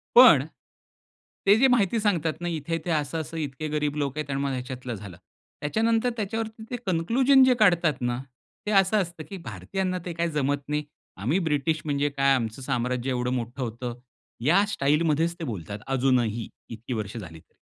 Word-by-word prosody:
पण, 485 - +9 1.0
ते 200 - +8
जे 270 - +6
माहिती 230 -3 +3
सांगतात 170 -7 +1
ना, 175 - -2
इथे-इथे, 165 +1 -3
असं-असं, 160 +2 -2
इतके 150 0 -4
गरीब 150 -1 0
लोक 145 0 -2
आहेत 150 -2 -3
आणि 135 - -1
मग 140 - -1
ह्याच्यातलं 125 -1 -5
झालं. 95 -4 -10 0.4
त्याच्यानंतर 225 +9 +1
त्याच्यावरती 220 +1 -3
ते - - -1
कन्क्लुजन 245 +10 +4
जे 260 - +6
काढतात 170 -9 +3
ना, 120 0 0 0.5
ते 210 - -1
असं 195 +1 +4
असतं 170 -3 -6
की 195 - -6
भारतीयांना 190 -1 -3
ते 175 - -4
काय 170 0 -1
जमत 145 -1 -1
नाही. 150 0 -1 0.3
आम्ही 130 - +1
ब्रिटिश 160 -1 0
म्हणजे 145 0 +1
काय, 140 -1 +3
आमचं 115 +1 -3
साम्राज्य 125 -1 -1
एवढं 125 -1 -1
मोठं 125 +1 -4
होतं. 120 +1 -5 0.5
या 180 +7 +5
स्टाईल 150 -5 +1
मध्येच 165 +3 +1
ते 165 - -5
बोलतात, 100 - -5
अजूनही 125 -4 +1 0.2
इतकी 115 +2 -6
वर्ष 110 0 -4
झाली 80 -6 -8
तरी. - - -29
150 Hz, 175 wpm, -26 LUFS, 125-180 Hz, 1.0 s, पण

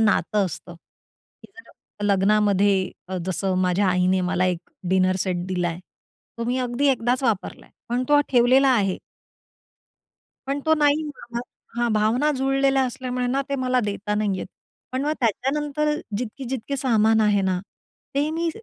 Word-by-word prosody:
नातं 210 -1 +2
असतं, 175 +1 -8 0.7
की - - -15
जर 210 - -12
लग्नामध्ये 200 -1 +3 0.2
अ, 190 - -3
जसं 190 0 -1
माझ्या 185 +2 +2
आईने 185 +1 +2
मला 180 0 0
एक 180 -2 0 0.3
डिनर 185 0 +3
सेट 180 -2 -1
दिलाय, 175 -2 -2 0.6
तो 230 - -2
मी 250 +2 0
अगदी 250 +3 0
एकदाच 250 0 +1
वापरलाय. 225 -6 -2 0.2
पण 240 +2 0
तो 290 0 +6
ठेवलेला 255 +2 +4
आहे. 195 -5 +1 1.5
पण 280 +1 -1
तो 315 - +5
नाही 295 0 +3
म्हणाला, 240 -5 -6 0.4
हां, 235 -2 +1
भावना 225 +8 +2
जुळलेल्या 270 0 +2
असल्यामुळे 250 0 -3
ना, 265 +3 0
ते 280 - -1
मला 255 -1 +1
देता 205 0 -2
नाही 205 -2 0
येत. - - -5 0.5
पण 260 - -1
मग 300 - +1
त्याच्यानंतर 295 +6 0 0.2
जितकी-जितकी 260 +2 -4
सामान 225 -4 +3
आहे 210 -2 +3
ना, 185 -1 0 0.6
ते 285 +2 +1
मी 330 +1 -1
235 Hz, 150 wpm, -23 LUFS, 195-270 Hz, 1.5 s, तो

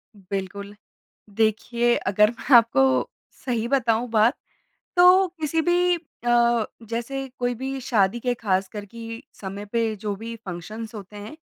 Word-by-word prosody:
बिल्कुल। 200 +1 -6 0.6
देखिए 235 +2 +1
अगर 210 +4 +2 0.2
आपको 230 - +6 0.6
सही 235 -3 -1
बताऊँ 240 -3 +1
बात 225 +3 +4 0.6
तो 365 +2 +7
किसी 315 +1 +1
भी 355 +1 +3 0.3
अ, 235 -1 +3 0.2
जैसे 270 +4 -3
कोई 245 0 0
भी 265 +3 -4
शादी 230 -3 +1
के 245 +1 0
ख़ास 190 -4 0
कर 205 -1 -7
कि 230 +3 -9 0.2
समय 200 +1 -6
पे 225 +1 -1
जो 205 0 -4
भी 230 +3 -7
फ़ंक्शन्स 215 +5 -7
होते 205 0 -10
हैं, 210 +8 -9
230 Hz, 135 wpm, -24 LUFS, 205-245 Hz, 0.6 s, तो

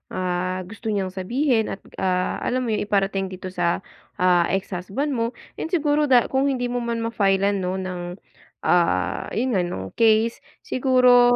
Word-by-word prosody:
ah, 185 0 -1
gusto 215 +5 -9
niyang 200 -3 -1
sabihin 225 +5 0
at, 195 - -6 0.2
ah, 180 -1 0
alam 255 +1 -1
mo 240 - -2
'yun, 215 - 0
iparating 195 -1 +1
dito 185 0 -7
sa, 175 -1 0 0.3
ah, 180 -1 +3
ex-husband 195 +8 -2
mo. 230 -2 -1 0.2
'Yun - - -2
siguro 300 -3 +2
da 250 -3 +4
kung 270 +1 +2
hindi 245 -3 -1
mo 245 - -1
man 235 -1 -2
ma-file-lan 200 -3 +1
'no, 185 0 -2
ng, 185 -1 -4 0.6
ah, 130 - +2
'yun 250 +4 0
nga, 195 -5 +2
ng 95 - -5
case 225 0 +4 0.2
siguro, 250 -1 +5
205 Hz, 165 wpm, -23 LUFS, 185-245 Hz, 0.6 s, siguro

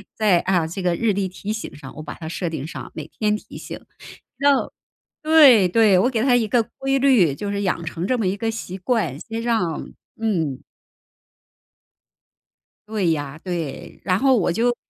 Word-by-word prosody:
在， 205 -6 +3
啊， 175 -4 +1
这 185 +4 -5
个 180 -1 +1
日 220 0 +1
历 195 -1 -1
提 200 +3 -5
醒 220 - -6
上， 145 -2 -11
我 155 - -7
把 - - -7
它 160 - -8
设 170 +1 -3
定 155 -2 -5
上， - - -8
每 155 -2 -7
天 210 -1 +1
提 - - -12
醒， - - -7 0.6
直 280 - -5
到 280 -2 +3 0.5
对 290 - +7
对， 205 -1 +4
我 240 - +3
给 225 -3 0
它 250 -1 +4
一 225 -3 0
个 235 +1 +3 0.2
规 270 0 +1
律， 235 - +4
就 205 +6 -4
是 200 0 -2
养 175 -3 -1
成 170 +2 -4
这 255 - +1
么 215 - 0
一 185 - +1
个 225 +2 -1
习 195 -4 -6
惯， 185 - -1
先 225 +2 -5
让 220 -9 -1 0.3
嗯。 170 - -1 2.3
对 205 -6 0
呀， 145 0 -3
对， 170 -7 -5
然 185 0 +1
后 265 -1 +4
我 180 -4 +1
就 240 +6 +1
200 Hz, 200 characters per minute, -22 LUFS, 170-230 Hz, 2.3 s, 对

